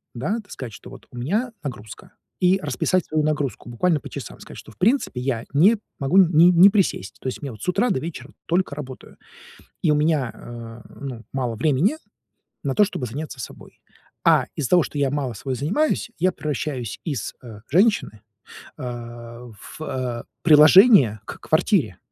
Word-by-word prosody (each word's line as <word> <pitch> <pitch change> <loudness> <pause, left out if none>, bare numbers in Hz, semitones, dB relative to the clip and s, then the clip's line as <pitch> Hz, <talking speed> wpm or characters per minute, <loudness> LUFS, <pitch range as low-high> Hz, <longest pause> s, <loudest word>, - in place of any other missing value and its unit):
да. 155 - -1
Так 205 -2 -15
сказать, 120 -4 -7
что - - -12
вот 130 -1 -13
у 125 - -11
меня 210 - -1
нагрузка, 115 -7 -8 0.3
и 185 +1 +3
расписать 150 +6 0
свою 155 0 0
нагрузку 145 -5 -2
буквально 150 +7 +1
по - - -10
часам. - - -8
Сказать, - - -12
что, - - -12
в - - -21
принципе, 220 - +1
я 125 -3 -2
не 190 +11 +5 0.2
могу 140 +7 +1
не 175 -2 +6
не 180 +3 +8
присесть. 105 - 0
То - - -5
есть 130 - -4
у - - -14
меня 140 - -4
вот 110 -2 -12
с - - -2
утра 200 +7 +1
до 130 - 0
вечера 150 -4 -8
только 175 -4 0
работаю, 135 -3 -9 0.7
и 155 - +4
у - - +3
меня, 150 -4 +1
э, 115 -1 -10 0.2
ну, 130 -5 -6
мало 125 -4 -2
времени 155 - +1 0.7
на 135 - -1
то, 210 - +5
чтобы 140 -10 -4
заняться 140 +3 -6
собой. - - -11 0.4
А - - +5
из-за 140 -5 -2
того, 175 -2 +6
что 150 - -7
я 140 - +2
мало 140 -4 -2
собой 130 +5 -4
занимаюсь, 210 - 0
я 185 +2 +3
превращаюсь 140 - -4
из, 140 -10 -3
э, 110 -4 -10
женщины, 185 - +2 0.6
а, 120 -2 -8
в, 110 +8 -13
э, 125 -5 -3 0.2
приложение 150 - +7
к - - -8
квартире. 155 - +1
140 Hz, 180 wpm, -23 LUFS, 120-175 Hz, 0.7 s, не